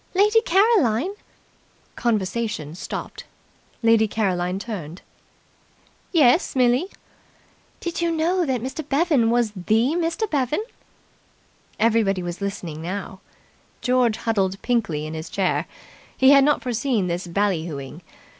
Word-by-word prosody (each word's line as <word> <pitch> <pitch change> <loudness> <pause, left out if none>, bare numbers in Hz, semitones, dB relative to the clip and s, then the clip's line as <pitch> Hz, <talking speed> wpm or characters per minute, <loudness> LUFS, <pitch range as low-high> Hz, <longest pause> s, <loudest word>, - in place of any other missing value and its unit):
"Lady 420 +4 +4
Caroline." 375 - +2 0.8
Conversation 210 -7 -2
stopped. 175 - -7 0.6
Lady 225 -1 +4
Caroline 185 -4 -1
turned. 185 -6 -7 1.1
"Yes, 300 -1 +3
Millie?" 250 +6 +3 0.9
"Did 345 0 -4
you 340 - +1
know 335 +3 +1
that 260 -7 -1
Mr. 265 +4 -4
Bevan 280 -5 +2
was 235 -2 +1
the 215 +5 +1
Mr. 335 +6 -1
Bevan?" 295 - 0 1.2
Everybody 215 -5 +2
was 175 +2 -6
listening 175 -6 -5
now. 190 +2 -5 0.6
George 245 -2 +2
huddled 195 -4 -1
pinkly 185 -12 0
in 155 - -6
his 160 0 -6
chair. 190 -2 0 0.5
He 265 +1 +6
had 275 -1 +7
not 295 +1 +2
foreseen 240 -4 0
this 175 +1 -3
bally 180 -2 0
hooing. 140 +1 -7
225 Hz, 115 wpm, -23 LUFS, 185-275 Hz, 1.2 s, had